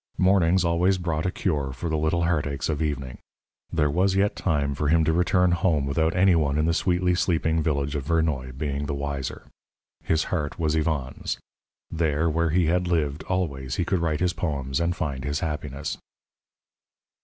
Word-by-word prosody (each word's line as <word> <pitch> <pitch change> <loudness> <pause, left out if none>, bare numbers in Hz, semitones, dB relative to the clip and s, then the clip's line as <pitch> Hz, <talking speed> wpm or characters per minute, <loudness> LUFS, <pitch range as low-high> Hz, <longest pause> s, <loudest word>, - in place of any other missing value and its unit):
Mornings 95 -1 +3
always 90 +3 +2
brought 85 -2 -1
a - - 0
cure 75 -9 -1
for 65 +6 -5
the 80 - -1
little 80 +2 +1
heartaches 75 -5 -1
of 75 -1 -1
evening. 70 -5 -3 0.5
There 75 -2 +2
was 95 +4 +2
yet 100 +1 +2
time 70 -5 0
for 75 +1 -2
him 80 +2 +4
to 80 +1 +2
return 90 +1 +3
home 85 -5 +1
without 80 +4 0
any 95 0 +5
one 75 -3 +1
in 75 - +2
the 85 - +2
sweetly 90 +1 +1
sleeping 80 -2 +1
village 70 -2 -1
of 70 -3 -3
Vernoy 75 -5 0
being 70 0 -2
the 70 - -2
wiser. 70 -1 -4 0.6
His 80 0 +1
heart 75 -3 -2
was 80 -2 0
Yvonne's; 75 -5 -2 0.5
there 80 0 +1
where 85 +1 +1
he 85 +2 +2
had 90 +2 +1
lived 75 -4 0
always 70 -8 -2
he 90 - 0
could 95 +1 +1
write 80 -2 -1
his 90 -1 +2
poems 70 -5 -2
and 85 +1 0
find 70 -7 -3
his 70 +1 -2
happiness. 75 -2 -4
80 Hz, 180 wpm, -25 LUFS, 70-85 Hz, 0.6 s, any